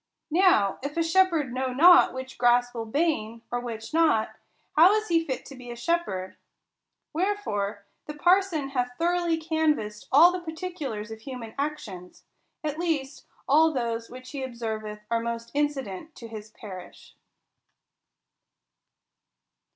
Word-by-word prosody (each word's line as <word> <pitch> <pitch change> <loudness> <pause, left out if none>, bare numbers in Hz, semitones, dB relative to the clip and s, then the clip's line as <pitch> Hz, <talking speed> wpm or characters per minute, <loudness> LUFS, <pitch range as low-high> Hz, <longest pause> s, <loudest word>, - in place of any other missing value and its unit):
Now 320 - +4
if 285 +4 -5
a 330 - +3
shepherd 330 -6 +2
know 260 0 -1
not 340 +8 +7
which 260 0 -8
grass 245 0 +3
will 225 -2 -5
bane, 230 -5 -1
or 245 - 0
which 230 +1 -7
not, 315 -10 +3 0.4
how 345 +6 +7
is 430 -1 -1
he 330 -1 +3
tit 265 -5 -4
to 275 - -10
be 250 -1 -11
a 240 - -5
shepherd? 235 - -2 0.8
Wherefore 300 - -1 0.2
the 300 - -6
parson 350 -3 +2
hath 250 -2 -2
throughly 345 0 +1
canvassed 315 -10 -1
all 325 +6 +8
the 365 - -3
particulars 320 -10 -5
of 220 0 -8
human 250 -3 -7
actions; 275 -12 -5 0.4
at 305 0 -3
least 305 -6 -2 0.2
all 315 +3 +5
those 230 -4 -2
which 255 +1 -10
he 280 - -5
observeth 220 -4 -5
are 230 - +2
most 235 0 -4
incident 290 - -2
to 230 - -9
his 215 -1 -9
parish. 190 -4 -11
265 Hz, 140 wpm, -26 LUFS, 230-325 Hz, 0.8 s, all